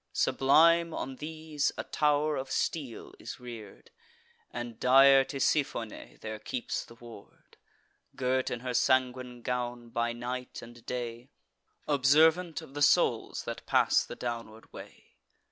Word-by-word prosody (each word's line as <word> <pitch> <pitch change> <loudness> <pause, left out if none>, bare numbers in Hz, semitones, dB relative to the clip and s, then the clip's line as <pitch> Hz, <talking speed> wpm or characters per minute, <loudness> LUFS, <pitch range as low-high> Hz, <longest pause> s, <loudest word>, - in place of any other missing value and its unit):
Sublime 165 +4 +4
on 130 0 -5
these 155 -1 -2
a - - -3
tow'r 150 0 +1
of 135 -1 -4
steel 135 -4 -3
is - - -8
rear'd; 115 -5 -11 0.6
And 120 -2 -6
dire 135 +1 +7
Tisiphone 135 -4 -2
there 110 0 -6
keeps 125 +3 -4
the 115 - -15
ward, 115 -3 -15 0.6
Girt 130 0 0
in 120 - -4
her 125 -1 -3
sanguine 125 -1 +1
gown, 120 -1 -3
by 120 0 -1
night 125 +2 -6
and 120 0 -13
day, 120 0 -5 0.6
Observant 155 +4 +3
of 135 - -14
the 145 - -5
souls - - +2
that - - -7
pass - - +3
the - - -8
downward 115 -2 -6
way. - - -13
125 Hz, 130 wpm, -29 LUFS, 120-145 Hz, 0.6 s, dire